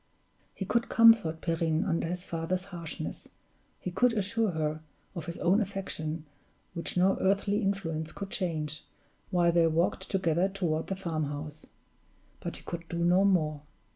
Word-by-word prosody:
He 195 - -4
could 235 +4 +1
comfort 225 -9 +6
Perrine 165 0 +1
under 165 -3 0
his 180 +1 -4
father's 170 +3 -2
harshness, 170 -2 -5 0.5
he 180 - -4
could 245 +6 +3
assure 220 +1 +1
her 155 -2 -2 0.3
of 175 -2 -6
his 170 - -4
own 185 +6 +3
affection, 165 -6 -4 0.5
which 170 +1 -2
no 190 +2 +4
earthly 200 +2 +2
influence 165 -6 -1
could 200 -1 -7
change, 155 -5 -2 0.5
while 175 -1 +3
they 170 -1 +4
walked 170 +3 0
together 185 -1 +2
toward 170 -5 -1
the 195 - -2
farmhouse; 155 -4 -4 0.7
but - - -5
he - - -14
could 170 -1 -6
do 170 - -3
no 180 +3 +5
more. 155 -7 +2
175 Hz, 150 wpm, -30 LUFS, 160-195 Hz, 0.7 s, comfort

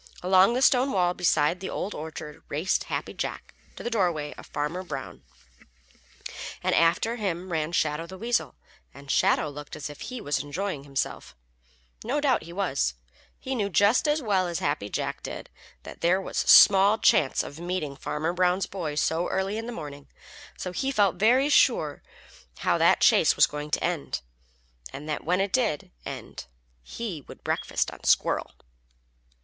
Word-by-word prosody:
Along 190 +4 +5
the 255 - +1
stone 260 +1 +4
wall 180 -2 +2
beside 175 -1 +2
the 190 - -5
Old 205 - -3
Orchard 155 -1 -8
raced 160 +7 0
Happy - - -4
Jack - - -5 0.2
to - - -9
the 240 - -3
dooryard 175 -9 0
of - - -12
Farmer 150 +5 -3
Brown, 140 -7 -7 1.4
and - - +1
after 175 +8 +2
him 185 -4 -3
ran 160 -1 -1
Shadow 155 -1 0
the 190 +2 -9
Weasel, 235 +4 -1 0.4
and 140 -1 -7
Shadow - - +3
looked 145 0 -8
as 150 -1 -6
if 145 - -13
he 255 -1 -6
was 145 -8 -1
enjoying 145 +1 -4
himself. 135 -1 -4 0.7
No 265 +6 -1
doubt 280 -3 +2
he 170 - -10
was. 170 - -1 0.4
He 265 - -5
knew 210 -6 -1
just 205 - +3
as 295 -1 +1
well 195 -5 +1
as 170 -1 -2
Happy 145 -8 -2
Jack - - -3
did - - -7 0.3
that - - -11
there 175 +3 +3
was 195 - -7
small 200 +2 +7
chance 140 -10 +3
of 145 - -9
meeting 175 -5 -3
Farmer 155 +3 -3
Brown's 180 +1 +2
boy 165 -6 -5
so 160 +3 0
early 190 +2 -1
in 225 +1 -4
the - - -4
morning, 145 -9 -8 0.5
so 180 - -5
he 270 +9 -1
felt 200 -7 +2
very 245 +8 +4
sure 195 - +3 0.6
how - - +2
that - - +4
chase - - +5
was - - +6
going 150 0 -6
to - - -1
end, 170 -5 -2 0.7
and 140 +3 -8
that 150 - -3
when 180 +3 +1
it 195 0 -1
did 225 - 0 0.2
end - - -8 0.3
he 175 - -6
would - - -13
breakfast - - -1
on - - -13
Squirrel. - - +1
180 Hz, 170 wpm, -26 LUFS, 150-205 Hz, 1.4 s, small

